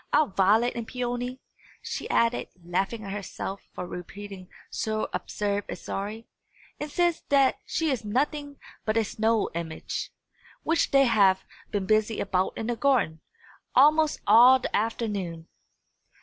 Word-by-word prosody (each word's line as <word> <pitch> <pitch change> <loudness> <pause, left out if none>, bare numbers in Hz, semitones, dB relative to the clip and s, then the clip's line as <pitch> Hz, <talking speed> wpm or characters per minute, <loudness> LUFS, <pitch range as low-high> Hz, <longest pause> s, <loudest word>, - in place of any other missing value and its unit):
Our 305 - +4
Violet 210 +6 +3
and 235 -1 -4
Peony," 245 +1 -3 0.4
she - - -5
added, 230 +1 +2 0.2
laughing 195 +6 -1
at 195 - -6
herself 195 -1 -5
for 180 - -6
repeating 185 +1 -8 0.2
so 215 0 -1
absurd 205 -1 -2
a - - -3
story, 210 +3 -5 0.5
"insist 335 +3 0
that 275 -2 +4
she 320 -2 0
is 260 - -2
nothing 285 +6 -1 0.3
but 215 +1 0
a 225 - +4
snow 220 +1 0
image, 165 -1 -4 0.5
which 330 +1 +2
they 275 0 +5
have 195 -5 +4 0.2
been 200 -2 -2
busy 215 +1 +2
about 185 -1 0
in 225 - -3
the 240 +1 -1
garden, 230 - +1 0.5
almost 305 +3 +5
all 240 +5 +8
the 255 - -3
afternoon." 200 -7 -2
220 Hz, 135 wpm, -27 LUFS, 195-255 Hz, 0.5 s, all